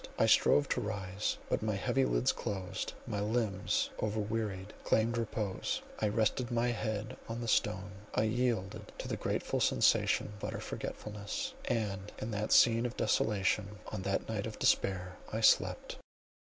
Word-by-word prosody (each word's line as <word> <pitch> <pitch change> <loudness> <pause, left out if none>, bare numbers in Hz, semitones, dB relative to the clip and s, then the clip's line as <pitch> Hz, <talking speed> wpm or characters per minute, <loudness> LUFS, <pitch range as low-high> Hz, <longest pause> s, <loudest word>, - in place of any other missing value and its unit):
I - - +4
strove 145 - +5
to 125 - +1
rise, 100 -2 -2
but - - 0
my - - 0
heavy 65 - +1
lids - - +2
closed, 95 -2 -4
my 105 - -2
limbs 105 -2 0
over 110 0 -1
wearied, 105 -2 -2
claimed 115 +1 +2
repose—I 110 -1 -2
rested 110 +4 +1
my 120 0 +1
head 110 -2 -2
on 115 +1 -3
the 120 - -4
stone, 105 -2 +1 0.2
I - - +3
yielded 110 -3 -1
to - - -5
the - - -1
grateful - - -1
sensation 105 - +3
of 105 - -14
utter - - -3
forgetfulness; 105 -1 -5
and 105 -4 -2
in 110 - -4
that 105 0 -2
scene 115 0 +6
of 120 - -9
desolation, 105 0 +1
on 105 - -4
that 100 +1 -1
night 110 -1 -2
of 110 - -7
despair—I 95 +3 0
slept. - - +3
105 Hz, 155 wpm, -33 LUFS, 100-115 Hz, 0.2 s, scene